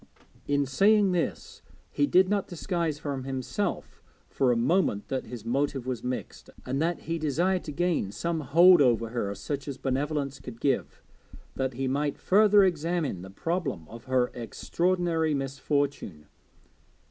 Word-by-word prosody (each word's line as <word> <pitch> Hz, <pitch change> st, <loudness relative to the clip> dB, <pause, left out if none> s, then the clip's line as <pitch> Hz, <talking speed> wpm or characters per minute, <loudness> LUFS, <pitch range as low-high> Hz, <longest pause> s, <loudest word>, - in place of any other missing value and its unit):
In 145 Hz, 0 st, +2 dB
saying 200 Hz, +8 st, +4 dB
this 175 Hz, -2 st, -3 dB, 0.3 s
he 290 Hz, -, +1 dB
did 185 Hz, -4 st, +5 dB
not 200 Hz, 0 st, 0 dB
disguise 170 Hz, -3 st, -2 dB
from 140 Hz, -3 st, -4 dB
himself 130 Hz, -1 st, -3 dB, 0.3 s
for 130 Hz, -2 st, +2 dB
a -, -, +2 dB
moment 125 Hz, -, +1 dB
that 130 Hz, -1 st, -2 dB
his 120 Hz, -3 st, -8 dB
motive 135 Hz, +1 st, -1 dB
was 125 Hz, -3 st, -4 dB
mixed, 125 Hz, 0 st, -5 dB, 0.2 s
and 135 Hz, +3 st, -2 dB
that 170 Hz, +1 st, 0 dB
he 165 Hz, 0 st, -3 dB
desired 175 Hz, +5 st, 0 dB
to 150 Hz, -, -5 dB
gain 165 Hz, -, 0 dB
some 165 Hz, +10 st, -2 dB
hold 170 Hz, +5 st, +6 dB
over 115 Hz, -4 st, +3 dB
her, 105 Hz, -4 st, -3 dB
such 140 Hz, +6 st, -5 dB
as 140 Hz, -2 st, -5 dB
benevolence 140 Hz, +1 st, -2 dB
could 115 Hz, -2 st, -10 dB
give, 120 Hz, -, -1 dB, 0.5 s
that 130 Hz, -1 st, -2 dB
he 135 Hz, +1 st, -2 dB
might 145 Hz, +2 st, -1 dB
further 205 Hz, +1 st, +5 dB
examine 165 Hz, -, 0 dB
the 95 Hz, -, -9 dB
problem 135 Hz, -, -3 dB
of 115 Hz, +1 st, -11 dB
her 130 Hz, -1 st, +1 dB
extraordinary 165 Hz, +6 st, 0 dB
misfortune. 135 Hz, -, -2 dB
140 Hz, 150 wpm, -27 LUFS, 125-170 Hz, 0.5 s, hold